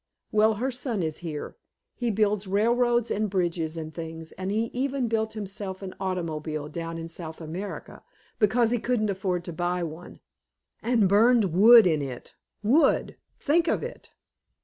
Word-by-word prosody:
Well, 215 +1 +4
her 255 +5 -1
son 240 -6 -2
is 155 -1 -2
here! 160 -4 -6 0.4
He 240 -1 -2
builds 210 -1 +1
railroads 235 +4 +2
and 215 0 0
bridges 170 -4 -1
and 160 -1 -6
things, 160 0 -7
and 185 0 -5
he 220 +3 -1
even 265 0 -1
built 220 -1 -1
himself 195 -2 -6
an 185 -1 -6
automobile 155 -5 -3
down 165 +1 -5
in 165 0 -5
South 165 -1 -7
America, 175 +5 -7 0.4
because 225 +2 +3
he 245 - +1
couldn't 215 -3 0
afford 185 -2 -2
to 175 - -6
buy 175 +1 -1
one, 165 +2 -8 0.6
and 225 -3 +3
burned 210 -1 +4
wood 225 +4 +8
in 155 -4 +2
it! 130 -3 -7 0.3
Wood! 265 +10 +3 0.2
Think 325 +3 +2
of - - +1
it! - - -8
195 Hz, 160 wpm, -26 LUFS, 165-230 Hz, 0.6 s, wood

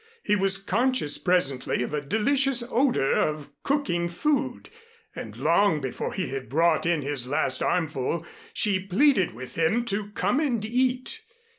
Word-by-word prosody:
He 210 - +2
was 195 -1 +3
conscious 210 - +1
presently 140 -9 +1
of 125 - -5
a 150 - -1
delicious 250 - +2
odor 240 - +2
of 150 -2 -1
cooking 215 -13 -1
food; 290 - -2 0.4
and - - -8
long 200 -7 +2
before 135 -3 -4
he 185 - -3
had 135 -4 -6
brought 165 +3 +2
in 165 -4 +1
his 135 -3 -2
last 130 -1 0
armful, 160 -2 -1 0.3
she 205 - +1
pleaded 195 - +2
with 130 +2 -8
him 190 +9 +1
to 205 -2 -2
come 205 +9 0
and 245 -9 -1
eat. 255 - -1
190 Hz, 150 wpm, -25 LUFS, 150-240 Hz, 0.4 s, was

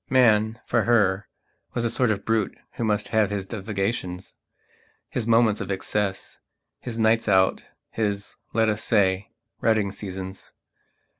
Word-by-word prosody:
Man, 115 -3 +4
for - - +1
her, 100 -4 +3 0.5
was 120 - 0
a - - +2
sort 125 0 +2
of 100 -2 -1
brute 115 -3 0
who - - -4
must 105 -1 0
have 110 -3 +2
his 100 -2 -3
divagations, 95 -3 -3 0.8
his 115 -2 -2
moments 115 -2 +4
of 100 - -5
excess, 95 0 -2 0.4
his 115 -2 -6
nights 110 0 +3
out, 95 -1 +3 0.2
his, 100 -2 -2 0.2
let 115 0 +2
us 105 0 0
say, 95 -3 +2 0.3
rutting 110 -3 +2
seasons. 95 -1 -7
105 Hz, 140 wpm, -25 LUFS, 95-115 Hz, 0.8 s, Man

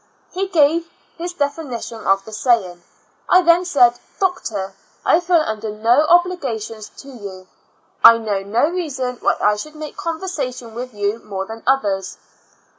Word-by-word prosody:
He 385 +2 -2
gave 330 -1 +2 0.3
his 350 +1 -4
definition 285 -7 -4
of 195 0 +2
the 220 - -10
saying. 215 -7 +1 0.5
I 365 0 +6
then 345 +1 +4
said, 245 -8 +4 0.2
"Doctor, 220 - -2 0.3
I 330 - +5
feel 345 -2 +2
under 220 0 -4
no 230 +8 +2
obligations 260 - 0
to - - -15
you; 200 -7 -10 0.6
I 230 - +10
know 215 -3 -2
no 220 +8 +1
reason 275 -8 -3
why - - +1
I 210 0 +2
should 305 +8 -8
make 305 -1 -8
conversation 295 -9 -4
with 250 +2 -6
you 205 +2 -1
more 195 -3 -5
than 225 +2 -9
others." 200 -8 0
250 Hz, 150 wpm, -20 LUFS, 215-325 Hz, 0.6 s, I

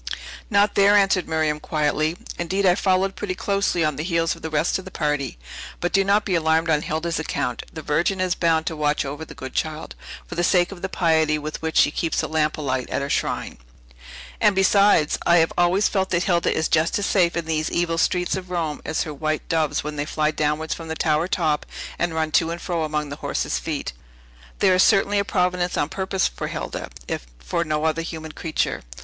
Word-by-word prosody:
"Not 205 -1 +3
there," 200 +1 +5
answered 195 -3 +3
Miriam 155 -1 0
quietly; 155 +2 0 0.2
"indeed, 190 +3 0
I 180 - +6
followed 190 +1 +1
pretty 185 -3 -3
closely 195 -4 0
on 150 -3 -1
the 150 - -2
heels 165 -1 0
of - - -15
the 160 - -4
rest 155 +4 +1
of 190 - -10
the - - -7
party. 150 - -2 0.4
But 175 - -2
do 195 - +4
not 200 +2 +2
be 190 - -1
alarmed 160 0 +2
on 150 -1 +3
Hilda's 160 +2 -2
account; 125 -6 -2
the 155 - -8
Virgin 170 +6 +1
is 185 -1 +1
bound 165 -2 +1
to 160 - -2
watch 150 -1 0
over 145 +3 -5
the - - -11
good 130 0 -8
child, 155 0 -3 0.3
for - - -9
the 175 - -1
sake 175 0 +3
of 185 -3 -9
the 190 - -3
piety 160 -4 +2
with 150 +1 -6
which 160 0 -2
she 145 - +5
keeps 165 +1 -1
the - - 0
lamp 155 -1 0
alight 130 -4 -2
at - - -1
her 140 - -3
shrine. - - -2 0.8
And 205 - +4
besides, 195 -4 +4
I 170 - +6
have 165 -1 +3
always 175 +4 +3
felt 190 -2 0
that 170 0 +1
Hilda 175 -3 +2
is 160 - 0
just 160 +1 +2
as 205 - -1
safe 175 -4 +2
in 170 - -2
these 155 -1 -1
evil 165 -1 0
streets 180 +1 +1
of 185 -1 -6
Rome 165 -4 -2
as - - -1
her 155 - -6
white 155 +1 -2
doves 155 -3 +1
when 150 0 -5
they 145 - -1
fly 155 0 0
downwards 155 +1 -1
from 165 - -8
the 160 - -3
tower 155 +1 +1
top, 155 -6 0 0.4
and 170 -1 -1
run 160 -1 0
to 165 +1 +3
and 170 +1 -4
fro 170 -2 -2
among 150 -1 -2
the 145 - -6
horses' 65 - -1
feet. - - -4 0.6
There 190 -2 +4
is 185 - +4
certainly 200 +1 +4
a - - +2
providence 180 -2 0
on 145 - 0
purpose 190 0 0
for - - -5
Hilda, - - -5 0.2
if - - -4
for 60 - -2
no 155 -1 -1
other 160 +1 +1
human 160 -1 -6
creature." 160 0 -2
165 Hz, 220 wpm, -23 LUFS, 155-180 Hz, 0.8 s, I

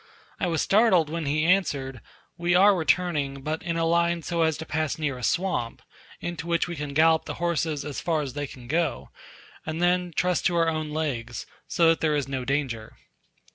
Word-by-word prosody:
I 180 - 0
was 165 -3 0
startled 195 -7 +4
when 165 -2 -3
he 155 +2 +1
answered, 140 - +1 0.3
"We 175 +1 +1
are 200 +3 +7
returning, 155 -5 0
but 155 +2 -2
in 170 -1 -2
a 165 - +1
line 170 0 +2
so 170 +1 -1
as 160 -2 +2
to 160 - -6
pass 155 -1 -1
near 150 -4 -1
a 125 - -9
swamp, 170 - -1 0.4
into 175 -1 -5
which 170 0 +1
we 175 - -5
can 145 -2 -5
gallop 160 +1 +4
the - - -5
horses 160 -3 -1
as 145 -2 -5
far 160 -3 0
as 135 -3 -6
they 145 0 -3
can 125 -2 -12
go, 160 +2 -1 0.5
and 160 +1 -4
then 180 0 +2
trust 180 -2 +2
to 175 - -1
our 165 -1 +3
own 155 -1 -2
legs; 135 -7 -3 0.2
so 165 -2 +3
that 165 - +2
there 155 -2 +2
is 145 -3 -1
no 135 -2 -3
danger." 125 -5 -2
160 Hz, 205 wpm, -26 LUFS, 145-170 Hz, 0.5 s, are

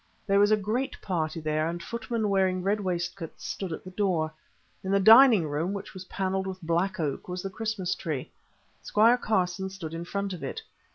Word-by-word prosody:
There 200 -1 +3
was 205 0 +5
a 215 - +4
great 220 +6 -2
party 165 -4 -2
there, 155 0 0
and 170 +1 -4
footmen 230 -1 -2
wearing 190 -2 +2
red 205 +2 +1
waistcoats 175 -2 -4
stood 190 -3 -4
at 160 - -5
the 185 - -9
door. 180 -6 0 0.5
In 190 - -4
the 200 0 +3
dining 220 - +8
room, 155 +6 -1
which 200 0 -6
was 185 -1 -9
panelled 190 0 -2
with 190 -1 -5
black 175 +4 0
oak, 150 -4 -2
was 180 0 -4
the 195 - -4
Christmas 215 -3 -2
tree. 155 -7 -4 0.5
Squire 230 +4 +4
Carson 190 -3 0
stood 180 -5 -7
in 165 +1 -5
front 200 +1 -3
of 175 - -7
it. - - -5
190 Hz, 195 wpm, -28 LUFS, 170-205 Hz, 0.5 s, dining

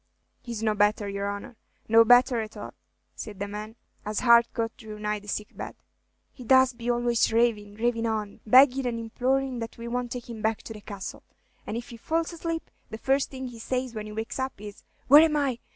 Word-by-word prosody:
"He 240 -2 -6
's 220 - -5
no 215 -1 +2
better, 205 0 +2
your 200 0 -3
honor, 200 +3 -7 0.3
no 225 +1 +7
better 245 +1 +5
at 215 0 -8
all," - - -8 0.4
said 210 -3 -8
the 200 +1 -3
man, 210 +2 -7 0.3
as 210 0 -2
Harcourt 235 -1 +4
drew 215 -2 -10
nigh 210 0 -2
the 205 - -17
sick 210 +1 -4
bed. - - -7 0.6
"He 255 - -12
does 260 +1 +5
be 235 0 -5
always 240 -1 +2
ravin', 220 -3 +1
ravin' 230 +1 0
on, 215 -2 -3
beggin' 260 +2 +6
and 230 -1 -2
implorin' 255 +3 -1
that 230 -1 -6
we 235 0 -7
won't 245 0 -3
take 245 -1 -6
him 230 -2 -7
back 220 +1 -1
to 225 - -8
the 210 - -11
Castle; 200 -2 -7 0.5
and 220 - -3
if 240 +3 -7
he 235 - -9
falls 325 +7 -1
asleep, 330 0 -4 0.2
the 220 - -6
first 270 +4 +1
thing 260 -1 -6
he 235 -2 -11
says 255 +1 -3
when 215 -1 -5
he - - -8
wakes 220 +4 -5
up 260 -5 -3
is, 205 -1 -10 0.2
'Where 290 +3 +9
am 315 -2 +3
I? 270 -5 0
230 Hz, 215 wpm, -27 LUFS, 215-250 Hz, 0.6 s, Where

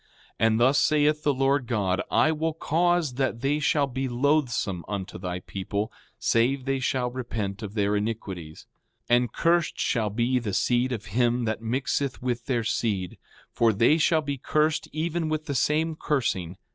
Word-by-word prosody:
5:22 115 - +4
And 110 0 +2
thus 130 +4 +4
saith 150 0 +3
the 150 - +2
Lord 135 -1 +1
God: 100 -6 0
I 155 - +3
will 160 0 -1
cause 170 -2 +1
that 130 -3 -1
they 145 +3 +1
shall 150 -1 +2
be 135 0 -3
loathsome 120 - 0
unto 95 -2 -5
thy 90 -1 -4
people, 100 +3 -4 0.3
save 120 +3 +1
they 135 -1 0
shall 125 -1 -1
repent 110 -5 -4
of 105 -1 -7
their 105 -1 +1
iniquities. 100 -7 -4 0.5
5:23 - - +8
And 120 -2 +1
cursed 170 +3 +1
shall 110 -5 +1
be 120 +4 +1
the 105 -5 -3
seed 120 +6 +1
of 110 -4 -4
him 120 0 +2
that 110 0 -2
mixeth 130 +3 -1
with 120 -1 -3
their 120 -4 0
seed; 105 -5 -2 0.3
for 115 -1 +3
they 115 +10 +3
shall 160 0 +3
be 140 -2 -3
cursed 155 +3 +1
even 160 +1 -2
with 155 0 -2
the 145 - -3
same 155 +4 +1
cursing. 95 - -1
125 Hz, 175 wpm, -26 LUFS, 110-145 Hz, 0.5 s, 5:23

